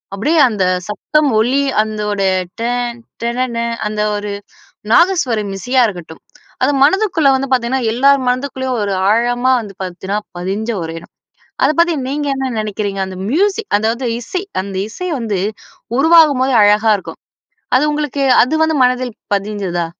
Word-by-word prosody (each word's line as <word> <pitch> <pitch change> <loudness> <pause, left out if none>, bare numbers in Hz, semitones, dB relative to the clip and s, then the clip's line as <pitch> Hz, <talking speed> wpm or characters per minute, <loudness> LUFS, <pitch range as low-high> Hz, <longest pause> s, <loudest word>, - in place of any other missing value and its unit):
அப்டியே 300 +11 +1
அந்த 205 -4 -1 0.2
சத்தம் 300 +8 +1
ஒளி 255 +5 +2 0.2
அதனுடைய 210 -3 -1 0.3
டன் 240 0 -2 0.2
டனன 240 0 -2 0.3
அந்த 210 0 -3
ஒரு 205 0 -4 0.6
நாதஸ்வரம் 245 - +2
இசையா 250 +6 +1
இருக்கட்டும். 175 -5 -8 0.4
அது - - +3
மனதுக்குள்ள 355 -2 +3
வந்து 270 +1 -2
பாத்தீங்கன்னா, 255 +1 +1
எல்லோர் 275 +4 +4
மனதிற்குள்ளேயும் 260 -1 -1
ஒரு 200 -1 -1 0.2
ஆழமா 245 +3 +2
வந்து 200 -2 -9
பாத்தீங்கன்னா 190 +3 -3 0.2
பதிஞ்ச 195 +6 -3
ஒரு 165 0 -5
இடம். 170 - -18 0.5
அத - - +4
பத்தி 340 0 +4
நீங்க 290 +2 -2
என்ன 265 -1 -2
நினைக்கிறீங்க. 205 -2 -3
அந்த 185 - -8
மியூசிக், 405 +6 0
அதாவது 230 +4 -1
இசை 360 +10 -4 0.2
அந்த 195 0 -7
இசை 365 +11 -6
வந்து 215 -5 -2 0.6
உருவாகும்போது 290 -5 +5
அழகா 210 +2 +4
இருக்கும். - - -10 0.6
அது 275 - +1
உங்களுக்கு 295 -2 -2 0.2
அது 290 +6 -1
வந்து 320 0 +1
மனதில் 250 -1 0 0.2
பதிஞ்சதா? 195 -4 -2
240 Hz, 140 wpm, -16 LUFS, 210-280 Hz, 0.6 s, உருவாகும்போது